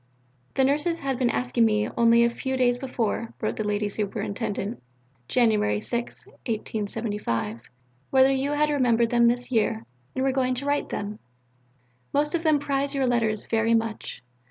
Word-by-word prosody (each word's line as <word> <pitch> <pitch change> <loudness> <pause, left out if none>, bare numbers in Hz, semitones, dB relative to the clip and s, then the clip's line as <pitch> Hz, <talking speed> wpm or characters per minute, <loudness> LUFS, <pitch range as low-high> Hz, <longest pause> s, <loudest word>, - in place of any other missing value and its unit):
"The 265 - +3
Nurses 295 +5 +1
had 270 -4 -2
been 250 -2 +2
asking 245 -1 +1
me 210 -1 +2
only 235 0 +5
a 235 - +4
few 265 +2 -3
days 245 -1 +2
before," 235 -3 -2
wrote - - -2
the 215 - -1
Lady 210 0 0
Superintendent 205 +1 -3 0.5
(Jan. 240 -3 +3
6, 215 +3 -1
1875), 210 - -3 0.5
"whether 265 0 +5
you 270 +2 0
had 300 0 +2
remembered 235 -5 +2
them 235 -1 +5
this 245 +2 0
year, 210 - +1 0.3
and 260 - 0
were 270 - +2
going 255 -1 +1
to 265 +3 -4
write 285 0 0
to - - -3
them. 210 +1 -5 0.9
Most 295 +3 +1
of 340 - +1
them 310 -3 +4
prize 280 0 -1
your 270 -1 +1
letters 225 -4 +1
very 225 0 +2
much. 225 - -3
235 Hz, 165 wpm, -25 LUFS, 220-270 Hz, 0.9 s, only